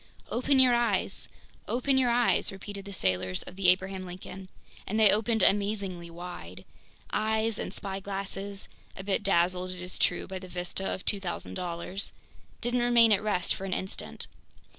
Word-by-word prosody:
"Open 260 +3 +2
your 255 -2 +6
eyes! 235 -5 +1 0.4
Open 260 +3 +1
your 260 -2 +4
eyes!" 240 0 +3
repeated 195 0 -8
the 200 - -7
sailors 95 - 0
of 180 - -10
the 195 -1 +1
Abraham 190 +1 +3
Lincoln. 185 +1 -8 0.4
And 215 +3 0
they 215 -2 +8
opened 220 0 +2
amazingly 200 -4 +1
wide. 170 - -8 0.5
Eyes 220 0 +1
and - - -3
spyglasses 195 0 -3 0.3
(a 190 - -5
bit 195 0 +1
dazzled, 185 -1 +2
it 185 0 -5
is 180 - -5
true, 175 - +2
by 190 0 -5
the 185 - -9
vista 180 +2 -2
of 190 - -4
$2,000.00) 180 -1 -2 0.5
didn't 245 +1 +1
remain 240 -2 +6
at 200 -1 +5
rest 205 -4 +1
for 195 - -6
an 190 - -2
instant. 190 - -5
195 Hz, 160 wpm, -29 LUFS, 180-215 Hz, 0.5 s, they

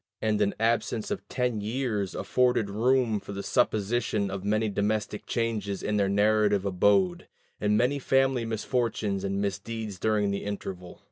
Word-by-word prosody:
And 105 -1 0
an 100 -1 +1
absence 115 - 0
of 205 - -4
ten 125 -4 -1
years 110 -3 -2
afforded 125 -5 +1
room 120 0 +2
for 100 - -9
the 100 0 -5
supposition 110 -3 0
of 95 -1 -5
many 110 +2 +1
domestic 105 +1 -2
changes 110 -4 -2
in 105 0 0
their 100 -1 +2
native 105 0 +3
abode, 95 -1 +2 0.3
and 105 0 +2
many 125 +5 +2
family 135 -2 +2
misfortunes 110 -3 -1
and 100 0 -1
misdeeds 100 +1 -4
during 105 -1 +1
the 100 - -3
interval. 95 -3 -6
105 Hz, 150 wpm, -27 LUFS, 100-115 Hz, 0.3 s, native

